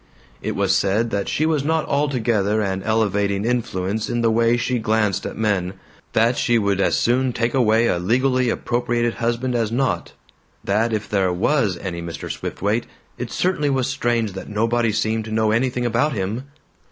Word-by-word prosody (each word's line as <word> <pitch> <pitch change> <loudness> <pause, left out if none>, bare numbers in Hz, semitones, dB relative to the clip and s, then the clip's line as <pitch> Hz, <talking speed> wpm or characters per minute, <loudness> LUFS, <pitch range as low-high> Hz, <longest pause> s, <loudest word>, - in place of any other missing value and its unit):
It - - -3
was 100 0 +2
said 110 +4 +1
that 100 -1 -1
she 155 - +1
was 155 -3 +1
not 160 +1 +1
altogether 120 -7 +1
an 95 -2 -1
elevating 105 -2 0
influence 110 -4 -1
in 120 - 0
the 115 -1 +3
way 115 +1 +3
she 125 +1 -1
glanced 110 -3 0
at - - -7
men; 100 -4 0 0.4
that 115 +2 +3
she 120 - +2
would 100 -3 +1
as - - +2
soon 125 +1 +1
take 115 0 -1
away 115 -3 +3
a 90 - +1
legally 125 +6 +2
appropriated 120 0 0
husband 120 +2 -1
as 115 -3 0
not; 130 +2 -1 0.5
that 110 +4 +1
if 105 -2 -2
there 95 -3 +1
WAS 100 +1 +1
any 85 -3 -5
Mr. 85 -4 -6
Swiftwaite, 105 +4 -2 0.3
"it 125 -1 -4
certainly 175 -5 0
was 135 -2 +1
strange 120 -5 0
that 95 - -8
nobody 115 +2 +1
seemed 110 +1 -1
to 110 - -7
know 110 0 +2
anything 125 +2 0
about 120 +6 +1
him!" 105 +5 -3
115 Hz, 175 wpm, -21 LUFS, 100-120 Hz, 0.5 s, the